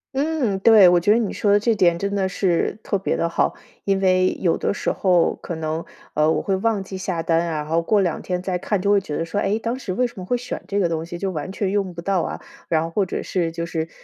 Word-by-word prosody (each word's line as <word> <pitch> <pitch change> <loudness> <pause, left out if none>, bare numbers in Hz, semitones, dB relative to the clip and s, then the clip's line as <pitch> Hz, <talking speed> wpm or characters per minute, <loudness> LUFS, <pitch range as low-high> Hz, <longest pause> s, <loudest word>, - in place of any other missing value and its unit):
嗯， 275 -8 0
对， 210 -2 +7
我 175 0 +5
觉 190 +4 +2
得 220 - +5
你 225 -4 -1
说 205 - +1
的 205 - +5
这 230 +2 +2
点 175 -4 +3
真 200 +3 -2
的 195 -2 0
是 180 0 0
特 200 - -1
别 - - -1
地 170 - +1
好。 170 - 0 0.3
因 195 -1 +1
为 185 -1 +2
有 170 -3 +2
的 - - 0
时 200 - -1
候 180 -3 +2
可 170 - -6
能， 160 +1 -3 0.3
呃， 155 +1 +3
我 - - +1
会 195 - 0
忘 210 0 0
记 190 0 -8
下 185 -3 -2
单 165 0 +2
啊， - - -2
然 - - -6
后 165 +2 +1
过 205 +4 +2
两 175 -4 0
天 180 -1 -2
再 185 -2 -2
看 205 +2 -1
就 200 +2 +1
会 200 -1 +4
觉 150 -6 -5
得 165 - -1
说， 200 +5 -2
哎， 200 +2 +1
当 230 +2 -3
时 195 - -5
为 250 +7 +1
什 240 - -5
么 - - -6
会 245 +7 0
选 250 - -6
这 200 - -1
个 180 - +2
东 160 -1 -2
西， 170 +1 -7
就 190 +1 -2
完 155 +2 -5
全 195 -1 -2
用 195 -3 -1
不 170 - -6
到 190 -1 +1
啊， - - -4 0.3
然 160 -1 +2
后 165 - -5
或 195 +2 0
者 - - -3
是 170 -3 -1
就 170 0 -4
是， 165 -1 -3
190 Hz, 305 characters per minute, -22 LUFS, 170-205 Hz, 0.3 s, 对